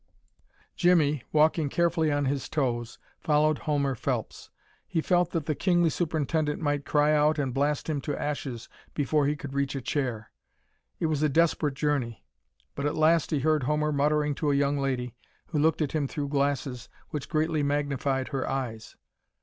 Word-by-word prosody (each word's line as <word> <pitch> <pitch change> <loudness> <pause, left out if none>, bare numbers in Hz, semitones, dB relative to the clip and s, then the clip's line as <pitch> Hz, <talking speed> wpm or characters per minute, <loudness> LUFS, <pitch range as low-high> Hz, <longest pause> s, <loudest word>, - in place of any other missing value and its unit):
Jimmie, 160 - +3
walking 155 0 +3
carefully 165 -1 +1
on 145 -1 +1
his 135 0 -2
toes, 120 -5 -2 0.2
followed 155 -1 +2
Homer 140 -2 +1
Phelps. 120 - -4 0.4
He 165 - -1
felt 175 +1 +2
that 165 -4 -2
the 155 - 0
kingly 175 +1 +2
superintendent 155 -2 -1
might 145 -2 -1
cry 150 0 +3
out 150 +1 +3
and 135 -4 -1
blast 145 +2 0
him 150 -3 -1
to 145 0 -3
ashes 135 -5 -4 0.3
before 145 0 +1
he 150 - +1
could 145 -3 -8
reach 140 0 -1
a - - -1
chair. 120 -6 -3 0.7
It - - 0
was 155 -2 0
a 155 - +3
desperate 155 -2 +2
journey. 135 -7 -1 0.5
But 140 +1 -2
at 145 - -2
last 160 +1 +3
he 150 -3 0
heard 155 +1 +2
Homer 150 +2 +1
muttering 150 +1 +1
to 150 - +2
a 140 - +2
young 140 0 +1
lady, 125 -3 -2 0.4
who 155 - -1
looked 160 +1 +2
at 145 - -3
him 150 -3 0
through 145 0 -4
glasses 140 -3 -1 0.2
which 150 -3 -5
greatly 155 -1 +1
magnified 140 -2 -1
her 135 -3 -2
eyes. 120 -5 -4
145 Hz, 175 wpm, -27 LUFS, 140-155 Hz, 0.7 s, Jimmie